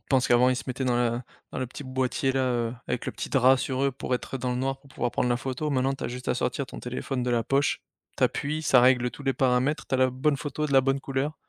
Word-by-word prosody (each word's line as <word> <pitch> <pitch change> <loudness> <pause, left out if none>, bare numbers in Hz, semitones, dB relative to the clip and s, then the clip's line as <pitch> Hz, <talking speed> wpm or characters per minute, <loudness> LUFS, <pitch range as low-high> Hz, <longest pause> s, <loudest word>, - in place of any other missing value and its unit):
Je - - -46
pense 130 -2 +3
qu'avant, 125 +1 +5
ils 130 - +2
se - - -5
mettaient 130 0 -3
dans 125 -1 +2
la 120 0 0 0.3
dans - - -4
le 130 - -2
petit 130 +4 -9
boîtier 130 +1 0
là, 135 - +1
heu, 120 -1 -1
avec 125 - -3
le - - -2
petit - - -5
drap 130 0 +5
sur 130 +1 -2
eux 140 - +3
pour 125 -1 -2
être 135 - -4
dans 125 0 -2
le 125 - -1
noir, 135 +1 -1
pour 140 - -19
pouvoir 125 -2 -2
prendre 125 - 0
la 120 - +2
photo. 135 +4 -3
Maintenant, 135 0 +1
tu - - -7
as - - -1
juste 125 +1 -6
à - - +2
sortir 130 +2 -1
ton - - -9
téléphone 125 +1 -3
de 125 - -1
la 120 -1 +2
poche. 140 +4 +1 0.4
Tu - - -3
appuies, 155 +2 -1
ça 130 -4 +5
règle 125 -1 +4
tous - - -11
les 135 -1 +1
paramètres, 130 +4 +1
tu - - -2
as 130 - +2
la 130 0 +4
bonne 140 +3 +1
photo 150 +1 -3
de 140 - -4
la 135 - +7
bonne 135 +1 0
couleur. 135 +3 -2
130 Hz, 300 wpm, -27 LUFS, 125-135 Hz, 0.4 s, la